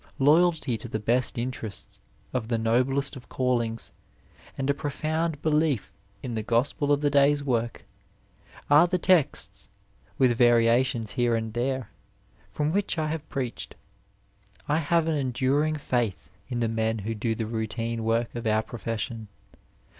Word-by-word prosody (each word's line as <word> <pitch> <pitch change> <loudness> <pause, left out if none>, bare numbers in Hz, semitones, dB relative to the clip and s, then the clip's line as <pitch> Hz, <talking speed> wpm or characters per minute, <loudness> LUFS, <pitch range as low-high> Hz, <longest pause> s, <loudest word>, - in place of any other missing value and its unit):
Loyalty 150 -4 +3
to 120 - -7
the 110 - -2
best 120 +5 0
interests 115 -4 -5 0.3
of 125 -4 -2
the 115 -1 0
noblest 130 +6 +1
of 130 - -12
callings, 120 -3 -1 0.7
and 135 - -1
a 140 - +3
profound 155 +2 -2
belief 150 -6 +1 0.3
in 125 - -4
the 110 - -1
gospel 125 +6 0
of 145 0 +3
the 145 -1 +2
day's 145 +1 +4
work 120 -3 -1 0.8
are 150 +4 +6
ike 180 -2 +1
texts, 135 - +2 0.5
with 125 -2 +4
variations 120 -1 +3
here 120 +1 +1
and 110 -1 -3
there, 130 +2 -2 0.6
from 150 0 -1
which 200 -1 0
I 155 -1 0
have 160 -1 -5
preached. 130 -4 -4 0.9
I 150 +2 +2
have 165 +1 +2
an 160 -1 0
enduring 135 +3 +1
faith 120 - -2 0.2
in 120 -2 -2
the 115 - +2
men 110 0 0
who 110 +2 -3
do 115 +1 -1
the 110 - -2
routine 115 +1 -3
work 115 +1 0
of 120 -1 -4
our 110 0 +2
profession. 115 0 -4
125 Hz, 150 wpm, -26 LUFS, 115-145 Hz, 0.9 s, are